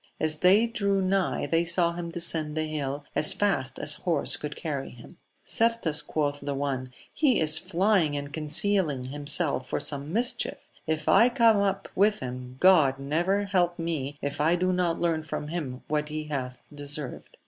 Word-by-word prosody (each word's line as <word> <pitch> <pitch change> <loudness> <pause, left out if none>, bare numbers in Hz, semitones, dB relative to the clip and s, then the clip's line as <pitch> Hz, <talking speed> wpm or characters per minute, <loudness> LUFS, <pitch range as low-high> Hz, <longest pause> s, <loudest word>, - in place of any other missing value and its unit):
As 155 -1 +1
they 195 +6 +4
drew 200 -4 -1
nigh 190 0 0
they 165 +1 +1
saw 170 0 +3
him 170 0 -6
descend 165 -3 +1
the 155 - 0
hill 145 -2 -4
as 155 - +6
fast 135 -10 -1
as 150 - +1
horse 165 -5 0
could 150 0 -7
carry 145 -5 -5
him. 120 +9 -15 0.3
Certes, 230 -9 0
quoth 145 -2 -2
the 145 -1 -4
one, 135 -2 -3 0.2
he 280 -6 +2
is 155 0 +5
flying 175 -4 +1
and 145 0 -7
concealing 155 -2 +2
himself 145 -1 +2
for - - -2
some 145 +1 -3
mischief: 240 +6 0 0.3
if 155 -1 -2
I 235 - +5
come 230 -4 +4
up 195 -1 -1
with 210 +2 +2
liim, 125 0 -8
God 160 -8 +4
never 170 +9 -1
help 180 -3 0
me 150 -4 -4
if 140 +1 -3
I 165 +3 +3
do 185 +1 0
not 180 -2 -1
learn 165 -2 0
from 150 -1 -6
him 145 -7 -5
what 150 0 -2
he 155 0 -4
hath 130 -4 -6
deserved. 145 -2 -7
155 Hz, 175 wpm, -26 LUFS, 145-185 Hz, 0.3 s, as